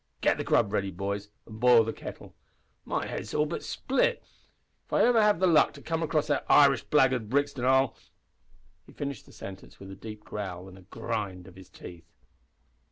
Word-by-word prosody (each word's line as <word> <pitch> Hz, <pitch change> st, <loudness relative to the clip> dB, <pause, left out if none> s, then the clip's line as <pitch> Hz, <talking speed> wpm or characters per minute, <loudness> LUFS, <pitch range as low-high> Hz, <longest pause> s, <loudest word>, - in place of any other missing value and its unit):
Get -, -, +2 dB
the -, -, -1 dB
grub 105 Hz, -4 st, +2 dB
ready, 100 Hz, -1 st, 0 dB
boys, 100 Hz, +2 st, -4 dB, 0.2 s
an' 110 Hz, -1 st, -11 dB
boil 120 Hz, -1 st, +6 dB
the 115 Hz, -, -3 dB
kettle. -, -, -10 dB, 0.5 s
My -, -, -2 dB
head -, -, -4 dB
is 110 Hz, -, -8 dB
all 150 Hz, -, +3 dB
but 150 Hz, -, -4 dB
split. 265 Hz, -, 0 dB, 0.6 s
If -, -, -12 dB
ever 240 Hz, -1 st, +4 dB
I -, -, +5 dB
have 210 Hz, -5 st, +3 dB
the 190 Hz, -, +3 dB
luck 165 Hz, -4 st, +4 dB
to 140 Hz, -, -13 dB
come 165 Hz, 0 st, -2 dB
across 155 Hz, -2 st, 0 dB
that 145 Hz, -2 st, 0 dB
Irish 140 Hz, -4 st, +6 dB
blackguard 130 Hz, -6 st, +2 dB
Brixton 140 Hz, -1 st, 0 dB
I'll 130 Hz, -1 st, +3 dB, 0.5 s
" 90 Hz, 0 st, -35 dB
He -, -, -16 dB
finished 140 Hz, -5 st, -6 dB
the -, -, -16 dB
sentence 95 Hz, 0 st, -11 dB
with 95 Hz, 0 st, -10 dB
a -, -, -8 dB
deep 105 Hz, 0 st, -10 dB
growl 95 Hz, -3 st, -6 dB
and 95 Hz, 0 st, -13 dB
a 90 Hz, -, -19 dB
grind 105 Hz, -6 st, -4 dB
of 95 Hz, -, -13 dB
his 95 Hz, -1 st, -14 dB
teeth. 85 Hz, -2 st, -12 dB
115 Hz, 205 wpm, -28 LUFS, 95-140 Hz, 0.6 s, boil